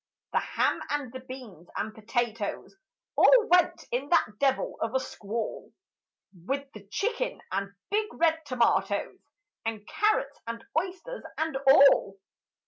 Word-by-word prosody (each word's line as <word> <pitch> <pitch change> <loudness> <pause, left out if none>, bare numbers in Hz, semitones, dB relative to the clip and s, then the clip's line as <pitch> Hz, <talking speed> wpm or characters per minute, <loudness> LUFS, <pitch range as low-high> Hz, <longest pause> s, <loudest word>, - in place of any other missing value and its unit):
The - - +4
ham - - 0
and 285 -4 -2
the 260 - -5
beans 255 - -10
and 220 - -3
potatoes 225 - -3 0.4
All - - +6
went 360 0 +4
in 260 +4 -2
that 220 -11 +2
devil 270 -1 +1
of 225 +3 -1
a - - +4
squall, 220 -3 -5 0.6
With 270 +10 -4
the 205 -2 -12
chicken 460 - -2
and 195 +1 -3 0.2
big 425 +1 +1
red 320 -1 +1
tomatoes, 250 -3 +1 0.4
And 220 -2 -4
carrots 420 -10 +1
and 230 0 -5
oysters 370 +9 -3
and 315 -2 -1
all. 270 -8 +6
260 Hz, 135 wpm, -28 LUFS, 220-320 Hz, 0.6 s, All